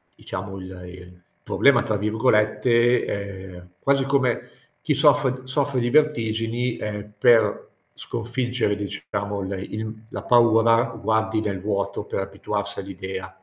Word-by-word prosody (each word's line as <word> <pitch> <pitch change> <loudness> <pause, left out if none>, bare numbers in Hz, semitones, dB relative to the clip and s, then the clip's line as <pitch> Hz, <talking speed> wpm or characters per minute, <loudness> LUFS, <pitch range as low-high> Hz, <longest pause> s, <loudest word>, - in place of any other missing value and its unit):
diciamo 95 +1 -6
il 95 -1 -9
"il 90 0 -13 0.2
problema", 140 -4 +4
tra 110 - -1
virgolette, 110 +2 +2
ehm, 95 -3 -6
quasi 140 -1 +2
come 135 -3 0 0.3
chi - - +1
soffre 130 0 +3
soffre 135 0 0
di 120 - 0
vertigini, 120 -4 +1
ehm, 105 0 -5
per 115 +2 +4 0.3
sconfiggere, 120 -2 -2
diciamo, 100 0 -4
il 95 +1 -4 0.2
il 110 0 -4 0.2
la - - -6
paura, 115 -1 +5 0.2
guardi 110 +1 +1
nel 100 -3 -2
vuoto 100 0 -2
per - - -4
abituarsi 100 +1 -4
all'idea. 95 -1 -6
110 Hz, 125 wpm, -23 LUFS, 100-120 Hz, 0.3 s, paura